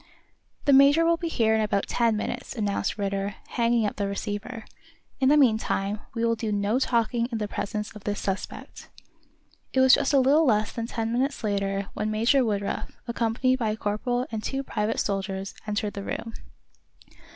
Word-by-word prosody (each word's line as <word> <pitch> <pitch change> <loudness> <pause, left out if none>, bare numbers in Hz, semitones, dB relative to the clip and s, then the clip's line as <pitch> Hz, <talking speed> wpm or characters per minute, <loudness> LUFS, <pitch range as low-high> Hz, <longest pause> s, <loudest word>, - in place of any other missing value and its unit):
"The 280 - +5
major 280 +4 +6
will 335 0 +3
be 335 - -3
here 225 -8 +2
in 220 - +2
about 205 -2 0
ten 230 -2 +1
minutes," 245 +5 -4
announced 205 -3 -1
Ridder, 200 0 -2
hanging 235 -2 +2
up 205 - -3
the 200 -2 -1
receiver. 205 +3 -5 0.5
"In 265 0 +4
the 300 - +5
meantime 215 -5 +2 0.2
we 230 0 0
will 230 0 +2
do 220 -1 -3
no 205 +4 +1
talking 235 -2 +1
in 230 - -1
the 210 -1 -2
presence 210 +1 -4
of 210 - -11
this 205 -1 -2
suspect." 195 0 -5 0.8
It 265 - +2
was 260 0 +7
just 285 -1 +3
a 280 - +5
little 280 +5 +4
less 215 -3 +2
than 230 -1 -4
ten 225 -1 -2
minutes 265 +2 -1
later 200 -1 -1
when 210 - -2
Major 230 +5 +3
Woodruff, 205 -3 -2
accompanied 240 +2 +1
by 225 -3 0
a 215 - -2
corporal 245 +4 -1
and 220 -1 -3
two 270 0 -2
private 215 -4 -2
soldiers, 195 -1 -2
entered 210 0 -2
the 200 - -5
room. 225 +3 -5
220 Hz, 185 wpm, -26 LUFS, 205-250 Hz, 0.8 s, was